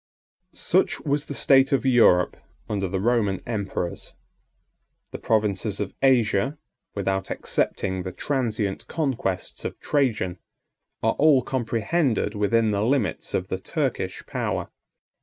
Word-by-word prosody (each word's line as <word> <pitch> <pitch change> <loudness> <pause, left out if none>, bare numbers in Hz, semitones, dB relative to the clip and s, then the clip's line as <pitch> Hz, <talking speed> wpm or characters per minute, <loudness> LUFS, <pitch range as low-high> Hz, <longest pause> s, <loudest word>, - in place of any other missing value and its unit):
Such - - +1
was 145 0 -1
the 140 - -5
state 135 0 +4
of 135 -1 +1
Europe 115 -9 +5 0.3
under 100 -2 -1
the 95 +1 -2
Roman 105 -3 +1
emperors. 100 -6 -4 1.0
The - - -6
provinces 105 -1 0
of 100 -1 -3
Asia, 130 0 +3 0.4
without 95 -1 -1
excepting 95 -1 -1
the 90 0 -5
transient 110 -6 -2
conquests 130 - -2
of - - -5
Trajan, 110 - 0 0.6
are 115 - +3
all 145 -4 +5
comprehended 120 - 0
within 110 +1 +2
the 100 0 0
limits 130 +4 0
of - - -2
the - - -2
Turkish - - -3
power. - - -3
110 Hz, 120 wpm, -25 LUFS, 100-135 Hz, 1.0 s, Europe